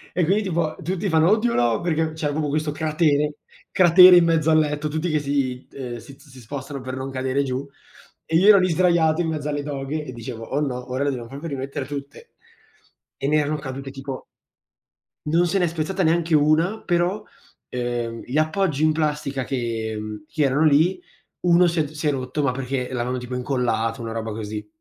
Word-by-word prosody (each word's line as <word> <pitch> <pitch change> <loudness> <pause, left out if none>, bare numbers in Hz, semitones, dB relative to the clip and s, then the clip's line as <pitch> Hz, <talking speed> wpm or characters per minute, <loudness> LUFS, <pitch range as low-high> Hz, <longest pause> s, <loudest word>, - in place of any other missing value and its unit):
E 180 - +2
quindi 200 +6 +2
tipo 170 -4 -1
tutti 185 +4 -2
fanno: 160 0 +4
"Oddio 225 +2 +2
no!" 120 -2 +2
Perché 160 -2 0
c'era 155 -2 -2
proprio 150 0 -1
questo 155 +1 -1
cratere 150 -1 +1 0.4
cratere 180 0 +8
in 175 - +5
mezzo 165 -1 +2
al 155 - +5
letto, 150 0 -1
tutti 155 +3 -2
che 155 -1 +1
si 140 -3 -2
ehm, 125 -3 -6
si 135 +4 -12
z 145 +1 -20
si 130 -1 -14
spostano 135 +3 -7
per 130 0 -5
non 130 +1 -5
cadere 130 +1 -1
giù 130 0 -3 0.6
e 160 - 0
io 180 +5 +5
ero 210 -2 +9
lì 185 0 +2
sdraiato 170 -2 +3
in 170 - -1
mezzo 150 -2 -3
alle 145 -1 -2
doghe 145 +1 -4
e 145 - -7
dicevo: 115 -1 -7
"Oh 140 - -2
no, 125 -3 -3
ora 130 +2 -1
le 145 - +1
dobbiamo 120 -4 -5
proprio 140 +6 -7
rimettere 140 -1 -4
tutte." 140 0 -8 0.9
E 135 - -2
ne 155 +2 +3
erano 150 0 0
cadute 135 -1 -6
tipo 135 -1 -7 1.1
Non 170 +3 +3
se 175 +3 +1
n'è 175 - +2
spezzata 170 +4 -2
neanche 165 0 +1
una, 155 +8 +2
però, 175 +4 0 0.5
uhm, 120 -2 -3
gli 130 +4 -3
appoggi 155 -1 +1
in 155 - +3
plastica 150 -3 -1
che 115 -4 -3
mhmm, 105 +2 -7
che 155 0 -1
erano 140 +2 +2
lì, 155 +5 +3 0.4
uno 175 0 +5
si 170 0 0
è - - +1
t 145 - -9
si 155 0 -3
è - - +3
rotto 130 +2 -3
ma 140 - +2
perché 130 -1 -3
l'avevano 125 +1 -2
tipo 125 0 -6
incollato, 120 -3 -1
una 115 -1 -5
roba 115 -1 -4
così. 105 0 -6
145 Hz, 205 wpm, -23 LUFS, 130-160 Hz, 1.1 s, ero